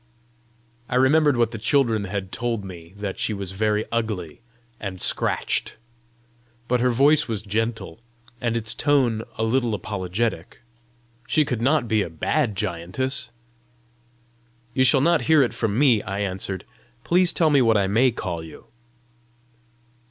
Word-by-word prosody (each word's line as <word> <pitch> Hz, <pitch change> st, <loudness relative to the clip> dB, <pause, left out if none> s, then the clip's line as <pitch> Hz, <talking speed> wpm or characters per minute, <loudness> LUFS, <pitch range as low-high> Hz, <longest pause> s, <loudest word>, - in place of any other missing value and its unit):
I -, -, -2 dB
remembered 140 Hz, +2 st, +4 dB
what 115 Hz, -1 st, +2 dB
the 115 Hz, -, -6 dB
children 110 Hz, -2 st, +1 dB
had 95 Hz, -1 st, -4 dB
told 115 Hz, -4 st, -2 dB
me 85 Hz, -1 st, -11 dB
that 100 Hz, -2 st, -5 dB
she 110 Hz, -, -1 dB
was 100 Hz, -2 st, -5 dB
very 105 Hz, +2 st, 0 dB
ugly, 110 Hz, -7 st, -3 dB, 0.4 s
and 95 Hz, -3 st, -6 dB
scratched. -, -, 0 dB, 0.9 s
But 125 Hz, 0 st, +1 dB
her 125 Hz, +1 st, +2 dB
voice 140 Hz, +5 st, +3 dB
was 110 Hz, -3 st, -3 dB
gentle, 110 Hz, -3 st, -3 dB, 0.4 s
and 115 Hz, -1 st, 0 dB
its 115 Hz, 0 st, 0 dB
tone 130 Hz, -7 st, +2 dB, 0.2 s
a 110 Hz, -, -1 dB
little 115 Hz, -1 st, +1 dB
apologetic: 105 Hz, +4 st, -3 dB, 0.6 s
she 155 Hz, -, +2 dB
could 125 Hz, -4 st, -3 dB
not 135 Hz, 0 st, +2 dB
be 110 Hz, -1 st, +2 dB
a -, -, -3 dB
bad 110 Hz, -, -1 dB
giantess! 105 Hz, +7 st, -2 dB, 1.4 s
"You 130 Hz, -, +3 dB
shall 130 Hz, +1 st, +4 dB
not 170 Hz, +1 st, +2 dB
hear 155 Hz, -3 st, +6 dB
it 120 Hz, -, -1 dB
from 110 Hz, -2 st, -1 dB
me," 125 Hz, -6 st, +4 dB
I 100 Hz, +2 st, -4 dB
answered, 95 Hz, -1 st, -4 dB, 0.4 s
"Please 175 Hz, 0 st, +3 dB
tell 160 Hz, -2 st, +2 dB
me 140 Hz, -2 st, +5 dB
what 115 Hz, -3 st, +4 dB
I 100 Hz, -, +2 dB
MAY 115 Hz, +7 st, +3 dB
call 90 Hz, -8 st, -4 dB
you!" 80 Hz, -2 st, -13 dB
115 Hz, 150 wpm, -23 LUFS, 100-130 Hz, 1.4 s, hear